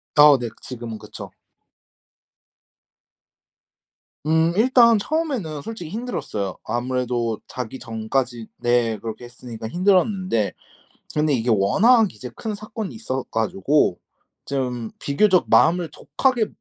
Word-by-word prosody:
아 145 Hz, -2 st, +8 dB
네, 120 Hz, -1 st, -3 dB
그 -, -, -22 dB
지금은 120 Hz, -3 st, -7 dB
그쵸. -, -, -10 dB, 2.9 s
음 160 Hz, +1 st, +3 dB
일단 235 Hz, -1 st, +5 dB
처음에는 250 Hz, -, -2 dB
솔직히 220 Hz, -6 st, -7 dB
힘들었어요. 180 Hz, -, -4 dB
아무래도 120 Hz, -2 st, -1 dB
자기 125 Hz, +1 st, -6 dB
전까지 115 Hz, +1 st, -2 dB
네 120 Hz, -2 st, +1 dB
그렇게 110 Hz, +2 st, -7 dB
했으니까 120 Hz, -2 st, -8 dB
힘들었는데. 185 Hz, -, +1 dB, 0.6 s
그런데 150 Hz, -1 st, +2 dB
이게 120 Hz, -1 st, 0 dB
워낙 210 Hz, -, +4 dB
이제 125 Hz, -2 st, -8 dB
큰 215 Hz, -2 st, -4 dB
사건이 215 Hz, -, -6 dB
있어 130 Hz, +4 st, -3 dB
가지고 110 Hz, +1 st, +1 dB, 0.5 s
좀 125 Hz, -4 st, -3 dB
비교적 185 Hz, +6 st, +2 dB
마음을 175 Hz, -1 st, +4 dB
독하게 245 Hz, -, 0 dB
135 Hz, 265 characters per minute, -22 LUFS, -, 2.9 s, 아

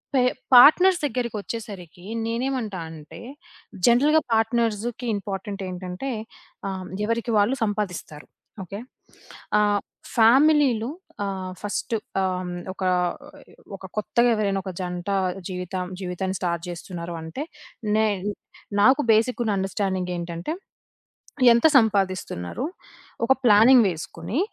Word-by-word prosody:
పె 255 Hz, -, +5 dB, 0.3 s
పార్ట్‌నర్స్ 355 Hz, +8 st, +8 dB
దగ్గరికొచ్చేసరికి 215 Hz, -, -5 dB, 0.2 s
నేను 230 Hz, +2 st, -2 dB
ఏమంటా 220 Hz, -8 st, -3 dB
అంటే, 155 Hz, -2 st, -11 dB, 0.7 s
జనరల్‌గా 295 Hz, +6 st, +5 dB
పార్ట్‌నర్స్‌కి 230 Hz, +1 st, 0 dB
ఇంపార్టెంట్ 200 Hz, 0 st, -5 dB
ఏంటంటే, 180 Hz, +7 st, -5 dB, 0.6 s
ఆహ్, 190 Hz, -1 st, -5 dB, 0.2 s
ఎవరికి 230 Hz, +1 st, -1 dB
వాళ్ళు 225 Hz, +7 st, +2 dB
సంపాదిస్తారు. 200 Hz, -8 st, -4 dB, 0.4 s
ఓకే. 200 Hz, +3 st, -7 dB, 0.8 s
ఆహ్, 205 Hz, -1 st, +2 dB, 0.4 s
ఫ్యామిలీలు 260 Hz, 0 st, +5 dB, 0.4 s
ఆహ్, 190 Hz, -2 st, -4 dB
ఫస్టు 215 Hz, +2 st, -2 dB, 0.2 s
ఆహ్, 180 Hz, -1 st, -2 dB, 0.2 s
ఒక 190 Hz, -, -6 dB, 0.9 s
ఒక 190 Hz, -, -19 dB, 0.2 s
కొత్తగా 240 Hz, +3 st, +2 dB
ఎవరైనా 200 Hz, -2 st, 0 dB
ఒక 190 Hz, -, -5 dB
జంట 180 Hz, +1 st, -4 dB, 0.4 s
జీవితం 180 Hz, 0 st, -4 dB, 0.2 s
జీవితాన్ని 185 Hz, +1 st, -3 dB
స్టార్ట్ 170 Hz, -1 st, -2 dB
చేస్తున్నారు 170 Hz, -1 st, -6 dB
అంటే, 210 Hz, -, -5 dB, 0.5 s
నే 220 Hz, 0 st, +3 dB, 0.8 s
నాకు 270 Hz, +5 st, +5 dB
బేసికున్న 225 Hz, -2 st, +1 dB
అండర్‌స్టాండింగ్ 190 Hz, -1 st, -2 dB
ఏంటంటే 170 Hz, -, -4 dB, 1.0 s
ఎంత 235 Hz, +6 st, +4 dB
సంపాదిస్తున్నారు, 195 Hz, -, +1 dB, 0.6 s
ఒక 265 Hz, -, +5 dB
ప్లానింగ్ 230 Hz, +2 st, +7 dB
వేసుకొని, 170 Hz, -, -5 dB
205 Hz, 100 wpm, -24 LUFS, 185-235 Hz, 1.0 s, పార్ట్‌నర్స్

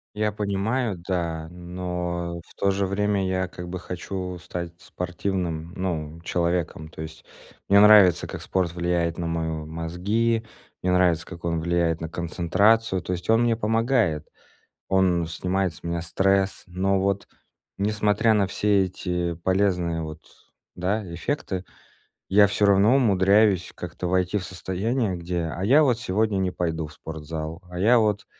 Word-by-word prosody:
Я 105 Hz, 0 st, 0 dB
понимаю, 105 Hz, +3 st, -1 dB
да, 85 Hz, -4 st, -2 dB
но 90 Hz, -1 st, -4 dB
в -, -, -19 dB
то 100 Hz, -, +1 dB
же 100 Hz, 0 st, +1 dB
время 100 Hz, 0 st, 0 dB
я 95 Hz, 0 st, 0 dB
как 90 Hz, -1 st, -8 dB
бы 90 Hz, +1 st, -5 dB
хочу 90 Hz, 0 st, -5 dB
стать 85 Hz, -1 st, -6 dB
спортивным, 90 Hz, -2 st, -3 dB
ну, 85 Hz, -4 st, -3 dB
человеком. 85 Hz, -2 st, -1 dB
То 80 Hz, -, -9 dB
есть 80 Hz, 0 st, -9 dB, 0.4 s
мне 100 Hz, +1 st, +6 dB
нравится, 100 Hz, -5 st, +7 dB
как -, -, -7 dB
спорт 90 Hz, -3 st, -1 dB
влияет 85 Hz, -1 st, 0 dB
на 85 Hz, -, -3 dB
мои 80 Hz, 0 st, -1 dB
мозги, 90 Hz, +9 st, -1 dB, 0.4 s
мне 90 Hz, -, +2 dB
нравится, 90 Hz, -3 st, +3 dB
как 85 Hz, -2 st, -11 dB
он 85 Hz, -1 st, 0 dB
влияет 85 Hz, -1 st, +1 dB
на 80 Hz, -1 st, -5 dB
концентрацию, 95 Hz, +5 st, +2 dB
то 90 Hz, -, -5 dB
есть 90 Hz, 0 st, -6 dB
он 115 Hz, -, +4 dB
мне 120 Hz, -1 st, +3 dB
помогает, 115 Hz, -, +1 dB, 0.6 s
он 90 Hz, -3 st, +2 dB
снимает 90 Hz, +2 st, -1 dB
с -, -, -16 dB
меня 85 Hz, 0 st, -2 dB
стресс, 95 Hz, +3 st, +1 dB
но 95 Hz, +2 st, 0 dB
вот 100 Hz, 0 st, 0 dB, 0.5 s
несмотря 105 Hz, +2 st, +2 dB
на 100 Hz, -2 st, +2 dB
все 100 Hz, 0 st, +2 dB
эти 90 Hz, -1 st, -2 dB
полезные 90 Hz, -1 st, 0 dB
вот, 80 Hz, 0 st, -7 dB, 0.5 s
да, 100 Hz, +5 st, -1 dB
эффекты, 95 Hz, -2 st, -3 dB, 0.6 s
я 100 Hz, +1 st, +6 dB
всё 105 Hz, +1 st, +1 dB
равно 100 Hz, +5 st, +5 dB
умудряюсь 100 Hz, -4 st, +3 dB
как-то 90 Hz, +1 st, -5 dB
войти 90 Hz, +2 st, +1 dB
в 90 Hz, -, -4 dB
состояние, 95 Hz, +3 st, -2 dB
где: 85 Hz, -1 st, -3 dB
"А 95 Hz, +3 st, -3 dB
я 145 Hz, +7 st, +6 dB
вот 125 Hz, -5 st, +2 dB
сегодня 105 Hz, -1 st, 0 dB
не 95 Hz, -1 st, 0 dB
пойду 80 Hz, -3 st, -2 dB
в 75 Hz, -, -14 dB
спортзал, 80 Hz, +1 st, -6 dB
а 90 Hz, -, -7 dB
я 115 Hz, +6 st, +5 dB
вот 105 Hz, -2 st, +1 dB
90 Hz, 155 wpm, -25 LUFS, 85-100 Hz, 0.6 s, нравится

